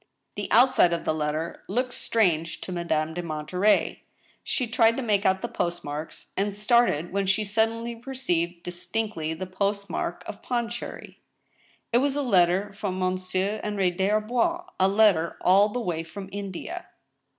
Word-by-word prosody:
The - - -5
outside 245 -8 +5
of 170 - -3
the - - +2
letter 155 +2 -2
looked 250 +5 -1
strange 165 -7 +1
to - - -6
Madame 160 -3 -1
de 175 - -3
Monterey. 170 +5 +1 0.4
She 255 - 0
tried 225 +1 +3
to 265 - -2
make 205 -3 +2
out 190 0 +1
the - - 0
post 175 0 -2
marks, 150 +2 -7
and 200 +1 -1
started 210 -6 +2
when 200 -1 0
she 190 +3 +2
suddenly 225 +3 0
perceived 180 -9 -2
distinctly 175 -2 -3
the 185 - -5
postage 200 +2 -2
mark - - -3
of - - -8
Pondicherry. 240 -1 -4 0.7
It 240 - +6
was 275 +1 +1
a 290 - 0
letter 190 -3 +3
from 200 -2 -3
Monsieur 185 +3 -1
Henri 200 -3 +1
des 190 +2 0
Arbois 245 +12 +1
— - - -42
a 190 - +5
letter 195 -5 +3
all 195 +3 +5
the 245 - -3
way 175 -8 -2
from 185 +4 -8
India 200 - -6
195 Hz, 165 wpm, -26 LUFS, 175-225 Hz, 0.7 s, It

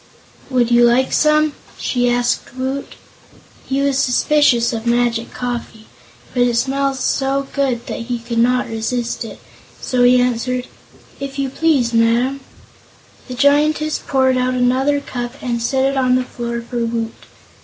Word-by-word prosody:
"Would 245 -2 +1
you 240 0 +5
like 240 +2 +3
some?" 305 0 +3 0.2
she 245 -1 0
asked 245 0 -1
Woot. 265 +2 -4 0.7
He 270 +1 0
was 275 -1 +1
suspicious 250 -2 +3
of 225 0 -4
magic 235 -1 +1
coffee, 240 -3 -5 0.5
but 245 - +1
it 245 -1 +2
smelled 275 +2 0
so 270 +1 0
good 265 -4 -1
that - - -5
he 245 -1 -1
could 235 0 -3
not 250 +2 +2
resist 230 +2 -3
it; 225 - -9 0.4
so 250 -1 -1
he 250 0 +6
answered: 250 +1 0 0.5
"If 275 0 -6
you 275 -1 -1
please, 275 -7 +1
Madam." 235 +4 +2 0.9
The 250 - -6
Giantess 300 +3 +2
poured 260 -1 +2
out 255 0 0
another 260 +3 +2
cup 245 -2 -5
and 235 -2 -2
set 265 +3 +1
it 275 0 0
on 255 -1 +3
the 255 - +1
floor 235 -1 -5
for 240 -1 -2
Woot. 230 -1 -2
250 Hz, 155 wpm, -18 LUFS, 240-270 Hz, 0.9 s, he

